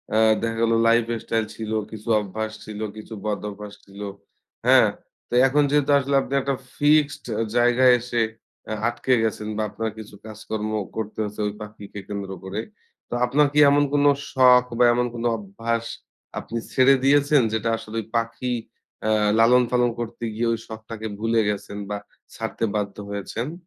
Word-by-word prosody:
আ -, -, +4 dB, 0.2 s
দেখা 115 Hz, 0 st, -2 dB
গেল 115 Hz, 0 st, +3 dB
life 115 Hz, 0 st, +4 dB, 0.2 s
style 110 Hz, -1 st, 0 dB
ছিল, 110 Hz, -1 st, -5 dB, 0.2 s
কিছু 110 Hz, +1 st, -10 dB
অভ্যাস 110 Hz, +2 st, -4 dB
ছিল, 105 Hz, -1 st, -7 dB, 0.2 s
কিছু 110 Hz, +1 st, -9 dB
বদ-অভ্যাস 105 Hz, 0 st, -4 dB
ছিল। 100 Hz, +1 st, -14 dB, 0.7 s
হ্যাঁ? -, -, +7 dB, 0.4 s
তো -, -, -8 dB
এখন 145 Hz, +2 st, +3 dB
যেহেতু 145 Hz, 0 st, +2 dB
আসলে 140 Hz, +1 st, -1 dB
আপনি 135 Hz, -, -6 dB
একটা 135 Hz, 0 st, -1 dB, 0.2 s
ফিক্সড 145 Hz, -1 st, +3 dB, 0.3 s
জায়গায় 125 Hz, +1 st, +5 dB
এসে 120 Hz, -1 st, -1 dB, 0.5 s
আ -, -, 0 dB
আটকে 120 Hz, +2 st, 0 dB
গেছেন। 110 Hz, -1 st, -2 dB
বা -, -, 0 dB
আপনার 115 Hz, +2 st, -3 dB
কিছু 105 Hz, -1 st, -10 dB
কাজকর্মও 110 Hz, -1 st, -4 dB
করতে 110 Hz, -1 st, -5 dB
হয়েছে 105 Hz, 0 st, -6 dB
ওই 105 Hz, -, -3 dB
পাখিকে 105 Hz, -1 st, -9 dB
কেন্দ্র 100 Hz, -1 st, -5 dB
করে। 95 Hz, +3 st, -4 dB, 0.5 s
তো -, -, -6 dB
আপনার 145 Hz, +4 st, +3 dB
কি 150 Hz, -, +3 dB
এমন 145 Hz, +1 st, +4 dB
কোনো 145 Hz, 0 st, +5 dB, 0.2 s
শখ 125 Hz, -1 st, +6 dB, 0.2 s
বা -, -, +6 dB
এমন 125 Hz, 0 st, +1 dB
কোনো 120 Hz, +1 st, -1 dB
অভ্যাস 115 Hz, +3 st, -3 dB, 0.5 s
আপনি 115 Hz, -, -6 dB, 0.2 s
ছেড়ে 135 Hz, +1 st, +6 dB
দিয়েছেন, 145 Hz, 0 st, +4 dB
যেটা 110 Hz, +1 st, 0 dB
আসলে 110 Hz, +1 st, -7 dB
ঐ -, -, -17 dB
পাখি 115 Hz, +2 st, -2 dB, 0.5 s
অ্যা 110 Hz, -, +1 dB, 0.3 s
লালন-পালন 125 Hz, +1 st, +4 dB
করতে 120 Hz, 0 st, -6 dB
গিয়ে 115 Hz, +2 st, -1 dB
ওই 115 Hz, -, -3 dB
শখটাকে 110 Hz, 0 st, -7 dB
ভুলে 115 Hz, +1 st, +1 dB
গেছেন 100 Hz, 0 st, -4 dB
বা 105 Hz, -, -2 dB, 0.4 s
ছাড়তে -, -, -4 dB
বাধ্য 100 Hz, -1 st, -2 dB
হয়েছেন? 110 Hz, +7 st, -4 dB
115 Hz, 160 wpm, -23 LUFS, 105-125 Hz, 0.7 s, হ্যাঁ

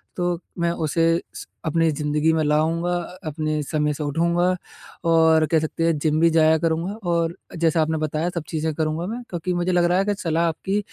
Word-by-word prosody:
तो 175 Hz, -1 st, -1 dB, 0.2 s
मैं 170 Hz, 0 st, +1 dB
उसे 165 Hz, +1 st, +1 dB
स -, -, -8 dB, 0.2 s
अपनी 165 Hz, +1 st, +2 dB
ज़िंदगी 150 Hz, +2 st, +1 dB
में 160 Hz, -1 st, +1 dB
लाऊँगा 160 Hz, +3 st, +1 dB
अ 175 Hz, +1 st, -7 dB
अपने 155 Hz, 0 st, -2 dB
समय 150 Hz, 0 st, 0 dB
से 150 Hz, -, -5 dB
उठूँगा 170 Hz, +4 st, +1 dB, 0.7 s
और 160 Hz, -1 st, +5 dB
कह 160 Hz, -, +4 dB
सकते 155 Hz, +1 st, -3 dB
हैं, 165 Hz, -2 st, +2 dB
जिम 155 Hz, 0 st, +1 dB
भी 170 Hz, -, +5 dB
जाया 160 Hz, -1 st, +4 dB
करूँगा 165 Hz, +4 st, -1 dB, 0.2 s
और 170 Hz, 0 st, 0 dB, 0.2 s
जैसा 165 Hz, 0 st, +2 dB
आपने 160 Hz, 0 st, 0 dB
बताया 155 Hz, +2 st, -1 dB
सब 165 Hz, -, -2 dB
चीज़ें 160 Hz, -1 st, -1 dB
करूँगा 160 Hz, +2 st, -1 dB
मैं। 235 Hz, +3 st, -4 dB
क्योंकि 180 Hz, +1 st, -3 dB
मुझे 175 Hz, +1 st, 0 dB
लग 175 Hz, -1 st, +3 dB
रहा 175 Hz, +1 st, +2 dB
है 195 Hz, -, +2 dB
कि 205 Hz, -, +1 dB
सलाह 165 Hz, 0 st, +1 dB
आपकी 190 Hz, +5 st, -1 dB
165 Hz, 205 wpm, -23 LUFS, 155-170 Hz, 0.7 s, और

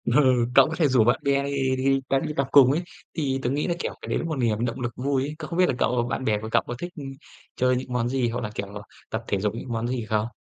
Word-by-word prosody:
Ừ, 125 Hz, -2 st, +3 dB
cậu 135 Hz, +1 st, +8 dB
có 160 Hz, -, -3 dB
thể 160 Hz, -2 st, +3 dB
rủ 130 Hz, -4 st, +4 dB
bạn 120 Hz, +1 st, +3 dB
bè 140 Hz, 0 st, +2 dB
đi 135 Hz, -2 st, 0 dB
đi 135 Hz, +1 st, +2 dB
à, 135 Hz, -, +3 dB
đi 150 Hz, -, -3 dB
tập 140 Hz, -1 st, +1 dB
cùng 135 Hz, -3 st, +7 dB
ấy, 155 Hz, +5 st, +1 dB, 0.3 s
thì 135 Hz, -4 st, -1 dB
tớ 120 Hz, -, +1 dB
nghĩ 145 Hz, +3 st, -1 dB
là, 175 Hz, -, 0 dB
kiểu, -, -, -3 dB
cái -, -, -8 dB
đấy -, -, +1 dB
nó -, -, -2 dB
cũng 165 Hz, -, -3 dB
một 160 Hz, -, -1 dB
niềm 115 Hz, -3 st, 0 dB
động 115 Hz, -2 st, -3 dB
lực 120 Hz, -1 st, -2 dB
vui 135 Hz, 0 st, 0 dB
ấy, 150 Hz, +2 st, -4 dB
cậu 155 Hz, -, -5 dB
không 170 Hz, 0 st, -3 dB
biết 185 Hz, -, +6 dB
là 130 Hz, -, 0 dB
cậu 125 Hz, -2 st, +1 dB
bạn -, -, -2 dB
bè 110 Hz, -3 st, +2 dB
của 110 Hz, -, -6 dB
cậu -, -, +4 dB
có -, -, -3 dB
thích 175 Hz, 0 st, -6 dB, 0.6 s
chơi 125 Hz, 0 st, +2 dB
những 125 Hz, 0 st, -4 dB
món 120 Hz, -1 st, 0 dB
gì 125 Hz, -2 st, 0 dB
hoặc 120 Hz, +2 st, -3 dB
là, 105 Hz, -, -3 dB
kiểu, 100 Hz, -, -3 dB, 0.4 s
tập -, -, -3 dB
thể 100 Hz, -, 0 dB
dục 105 Hz, +1 st, -1 dB
những 125 Hz, -, -7 dB
món 115 Hz, +1 st, -1 dB
gì 120 Hz, -2 st, -2 dB
không? 110 Hz, 0 st, 0 dB
130 Hz, 310 wpm, -25 LUFS, 120-140 Hz, 0.6 s, cậu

